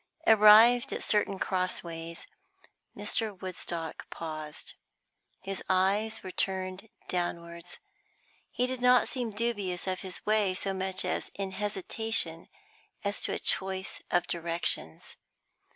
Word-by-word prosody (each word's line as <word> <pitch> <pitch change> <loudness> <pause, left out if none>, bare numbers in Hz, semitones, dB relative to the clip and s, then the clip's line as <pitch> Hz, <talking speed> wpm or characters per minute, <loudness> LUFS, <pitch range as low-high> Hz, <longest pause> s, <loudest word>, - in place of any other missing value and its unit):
Arrived 220 +3 +7
at - - -3
certain 205 -2 +1
cross 185 -1 -1
ways, 165 0 -7 0.7
Mr. 215 -5 -2
Woodstock 170 -3 -5
paused. 155 -2 -7 0.7
His 195 0 -5
eyes 195 +4 +2
were 185 - -6
turned 190 +2 -2 0.2
downwards; 170 -1 -4 0.7
he 250 - 0
did 255 -1 -3
not 250 0 +5
seem 245 -3 -2
dubious 205 -5 -2
of 185 -1 -2
his 185 -2 -7
way, 210 -3 +2
so 195 +1 0
much 190 0 -3
as - - -2
in 195 -1 -3
hesitation 200 -3 0 0.6
as 200 0 -2
to - - 0
a - - -1
choice 190 -1 -2
of 175 -1 +2
directions. 170 - -2
190 Hz, 120 wpm, -30 LUFS, 175-210 Hz, 0.7 s, Arrived